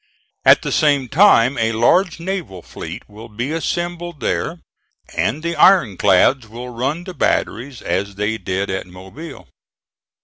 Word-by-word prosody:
At - - +6
the - - -3
same 145 -4 +2
time 140 - +4
a 115 0 +1
large 170 - +2
naval 170 - -5
fleet - - -9
will 110 +3 -12
be 120 +6 -4
assembled 175 0 -3
there, 165 - -2 0.6
and 145 +8 -1
the 170 0 -2
iron 170 - +5
clads 105 +7 +3
will 120 +3 -8
run 135 +8 -3
the 185 0 -8
batteries 130 -3 -2
as 95 +3 -2
they 105 +2 -2
did 95 +2 -2
at 95 -1 -4
Mobile. 95 - -11
125 Hz, 145 wpm, -19 LUFS, 105-165 Hz, 0.6 s, At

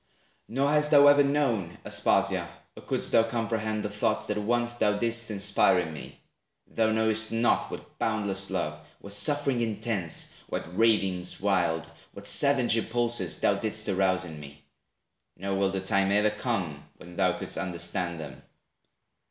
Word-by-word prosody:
Nor 135 +4 0
hast 150 0 +2
thou 145 -2 +6
ever 145 0 +6
known, 120 - -1
Aspasia, - - +1 0.3
Or - - -11
couldst - - -1
thou 115 - +5
comprehend 110 -1 -2
the - - -3
thoughts - - -1
that 105 - -3
once 120 +3 0
Thou 105 -3 0
didst 115 +1 0
inspire 100 -2 +2
in 85 -3 -2
me. - - -11 0.5
Thou 110 -1 0
knowest 110 0 +2
not 115 +1 +1
What - - -11
boundless 100 -3 -1
love, - - -3 0.2
what 100 - -8
sufferings 135 +4 +2
intense, 110 -6 -1 0.2
What 85 - -5
ravings 95 -5 +1
wild, 85 -5 0 0.2
what 100 - -11
savage 135 -1 +4
impulses, 115 -5 +2
Thou - - +2
didst 110 0 -1
arouse 95 -1 +1
in 80 -3 -9
me; 70 -1 -13 0.7
nor 100 +1 -4
will 95 0 +1
the 95 0 -3
time 100 0 +1
E'er 105 +1 +3
come 100 - -4
when 90 0 -13
thou - - +1
could'st - - -4
understand 85 -1 -2
them. 70 -3 -9
105 Hz, 155 wpm, -27 LUFS, 95-115 Hz, 0.7 s, thou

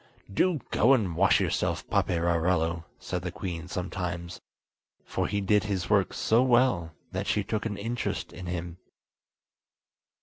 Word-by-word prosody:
"Do 175 - +2
go 130 +5 +5
and 95 -9 -1
wash 90 +1 +4
yourself, - - -1
Paperarello!" 85 -1 +1
said 90 - -4
the 90 0 -4
queen 90 -1 -5
sometimes, 90 -2 -4 0.6
for - - -1
he 100 - -1
did 105 +1 +3
his 100 -2 -2
work 100 -2 +3
so 115 +2 +3
well 120 -10 +3 0.2
that - - -3
she 105 - +1
took 110 +2 -2
an 105 - -4
interest 115 +3 -3
in 90 - -8
him. 85 -1 -4
95 Hz, 140 wpm, -28 LUFS, 85-105 Hz, 0.6 s, go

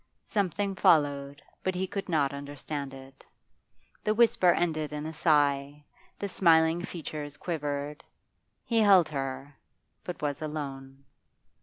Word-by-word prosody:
Something 200 -1 -1
followed, 145 -5 +2 0.2
but 185 -1 -1
he 185 +1 -1
could 195 +1 -5
not 145 -4 +1
understand 140 0 -5
it. 135 0 -13 0.8
The 215 0 +1
whisper 225 -6 +4
ended 155 -4 0
in 150 0 -4
a 160 - -5
sigh, 145 -2 +1 0.3
the 200 - -3
smiling 165 -3 +4
features 150 -4 -6
quivered. 150 -3 -4 0.6
He 230 -2 +1
held 195 -6 +6
her, 135 -1 -5 0.5
but 180 - -6
was 145 -1 -2
alone. 135 -3 -6
150 Hz, 125 wpm, -29 LUFS, 140-175 Hz, 0.8 s, held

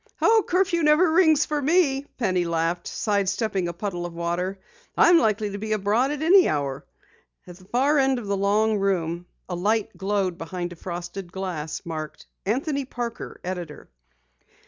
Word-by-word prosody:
"Oh, 445 -1 +4
curfew 360 -1 +2
never 310 +3 +4
rings 315 -3 +4
for 300 -1 -2
me," 285 -3 +2
Penny 185 -7 +1
laughed, 170 +1 -1
side 200 -3 0
stepping 195 -2 -1
a 170 - -4
puddle 175 -1 -4
of 175 -1 -6
water. 175 +3 -2 0.4
"I'm 345 -1 +7
likely 215 -5 +1
to 200 - -5
be 215 +1 -2
abroad 215 +6 +1
at 295 +1 -3
any 365 +3 +6
hour." 140 -3 -2 0.6
At 175 -1 -11
the 185 - -18
far 275 +8 +2
end 270 -1 +2
of 240 - -6
the 200 0 -1
long 210 +2 +2
room 175 -3 -1 0.2
a 180 - -5
light 210 +4 0
glowed 195 -3 -1
behind 175 +1 -5
a - - -12
frosted 175 +1 -7
glass 170 -5 -4
door - - -10
marked: 155 -2 -6 0.2
"Anthony 275 +6 0
Parker 240 -3 -6
Editor." 175 - -6
200 Hz, 170 wpm, -24 LUFS, 175-270 Hz, 0.6 s, I'm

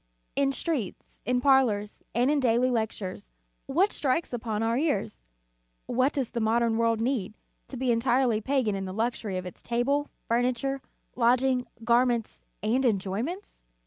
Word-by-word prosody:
In 275 -1 +2
streets, 275 - -4
in 250 0 +2
parlors, 245 -7 +2
and 245 +4 +3
in 300 - +2
daily 250 0 +3
lectures, 215 - -3 0.4
what 360 +9 +2
strikes 280 +1 0
upon 225 -2 -2
our 230 +1 +1
ears? 245 - -1 0.6
What 255 +3 +1
does 265 -5 -2
the 235 - -2
modern 225 0 +2
world 230 -1 +2
need, 225 -4 -1 0.3
to 265 - -7
be 255 0 +1
entirely 235 -1 +2
pagan 260 -3 +1
in 195 -1 -3
the 185 - -5
luxury 220 -3 -1
of 185 - -4
its 180 - -9
table, 275 +5 0 0.2
furniture, 250 +3 0 0.3
lodging, 250 +1 +2 0.2
garments 235 -1 +1 0.2
and 240 +5 +2
enjoyments? 220 - -2
240 Hz, 145 wpm, -27 LUFS, 220-265 Hz, 0.6 s, and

